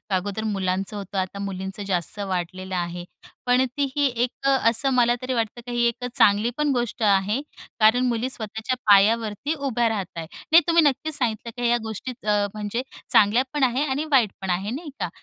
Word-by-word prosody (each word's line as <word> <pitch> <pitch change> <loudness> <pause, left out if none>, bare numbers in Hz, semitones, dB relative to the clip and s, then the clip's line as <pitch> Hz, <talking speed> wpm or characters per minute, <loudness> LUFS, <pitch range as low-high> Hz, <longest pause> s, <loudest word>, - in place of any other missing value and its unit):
अगोदर 200 +3 -2
मुलांचं 195 -1 -2
होतं, 200 -1 -6
आता 190 +1 -2
मुलींचं 195 0 -5
जास्त 180 +1 -2
वाढलेलं 185 -1 -3
आहे. 175 0 -3 0.4
पण 250 +1 +4
ती 285 - +2
ही 290 - +2 0.2
एक 250 - 0 0.2
अ, - - +5 0.2
असं 270 +4 +1
मला 240 -1 +4
तरी 255 +1 -2
वाटतं 230 0 -2
की 245 - -6
ही 240 0 +1
एक 235 +1 -3
अ, - - -1
चांगली 210 +3 +4
पण 300 -1 +1
गोष्ट 240 -2 -2
आहे 205 +5 +2 0.4
कारण 225 +4 +5
मुली 240 +1 -1
स्वतःच्या 220 +1 -4
पायावरती 215 +7 +4
उभ्या 260 -6 0
राहत 210 -4 -2
आहे. 165 -1 -5 0.2
नाही, 330 +2 +8
तुम्ही 335 -1 +5
नक्कीच 300 +2 +1
सांगितलं 230 -2 -2
की 245 -1 0
ह्या 240 - +3
गोष्टी 220 +3 -5 0.2
अ, 205 -1 +3
म्हणजे 215 +3 -3 0.3
चांगल्या 220 +5 +5
पण 295 -2 0
आहेत 260 +3 +1
आणि 280 +4 -1
वाईट 240 -8 +4
पण 190 - -4
आहेत, 195 +6 -1
नाही 310 +2 -7
का? - - -2
220 Hz, 195 wpm, -24 LUFS, 200-250 Hz, 0.4 s, नाही